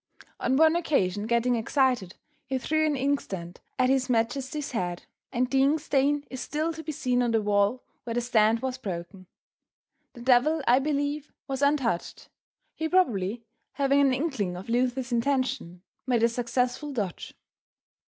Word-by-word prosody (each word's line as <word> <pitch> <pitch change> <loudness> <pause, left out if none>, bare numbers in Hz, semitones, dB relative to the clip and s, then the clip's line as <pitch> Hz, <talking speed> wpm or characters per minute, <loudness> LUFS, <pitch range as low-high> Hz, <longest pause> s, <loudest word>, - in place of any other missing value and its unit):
On 260 +2 +1
one 320 +1 +5
occasion 210 - 0
getting 235 +1 +2
excited, 240 -4 +1 0.3
he 265 - -1
threw 310 +5 +1
an 300 - +1
inkstand 200 -11 -2 0.2
at 255 - +3
his 265 -1 +1
majesty's 260 +5 -1
head, 180 -7 -3 0.3
and 250 +1 +1
the 270 -1 +3
ink 285 +4 +3
stain 290 0 +1
is 260 -1 -5
still 315 +2 -2
to 320 - -7
be 315 - -5
seen 250 -3 0
on 240 - +1
the 225 -1 +2
wall 205 +4 +1 0.2
where 230 -1 -4
the 240 - +1
stand 230 -2 +3
was 260 -1 -3
broken. 185 -2 -6 0.9
The 240 - -11
devil 265 +5 +3
I 245 +2 +6
believe, 290 +1 -2 0.2
was 270 -1 -3
untouched, 275 -10 0 0.4
he 320 0 -3
probably 230 - +1 0.3
having 280 0 +3
an 275 -1 +4
inkling 255 - -1
of 190 +5 -9
Luther's 250 +1 0
intention, 245 -7 -1 0.2
made 240 -3 +2
a 235 - +5
successful 245 +4 -1
dodge. 205 -9 -4
255 Hz, 160 wpm, -27 LUFS, 230-280 Hz, 0.9 s, I